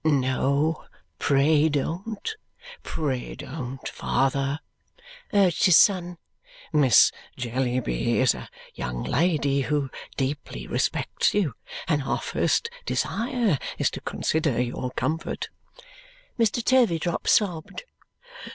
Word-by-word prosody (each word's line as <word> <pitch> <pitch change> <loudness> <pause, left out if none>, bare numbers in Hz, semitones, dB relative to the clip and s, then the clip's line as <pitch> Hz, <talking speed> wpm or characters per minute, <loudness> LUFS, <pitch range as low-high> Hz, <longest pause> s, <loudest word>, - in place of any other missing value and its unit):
"No, 140 +1 +1 0.3
pray 145 +2 +4
don't! 190 - -3 0.5
Pray 135 -6 -3
don't, 130 -2 -6
father," 135 +2 0 0.7
urged 195 -3 +3
his 180 -4 +7
son. 180 -3 +3 0.6
"Miss 135 -8 +6 0.3
Jellyby 125 - 0
is - - +4
a - - -9 0.2
young 60 -1 -4
lady 140 -1 +1
who 140 -1 -1 0.3
deeply 135 - -3
respects - - 0
you, 185 - +1 0.3
and 150 -3 +2
our 135 - -1
first - - 0 0.2
desire 230 - 0 0.2
is - - +1
to - - -7
consider 155 -6 0
your 125 +1 -2
comfort." 160 +5 -3 0.9
Mr. 230 +1 +2
Turveydrop 175 -10 +2
sobbed. 180 - +1
150 Hz, 100 wpm, -25 LUFS, 135-175 Hz, 0.9 s, his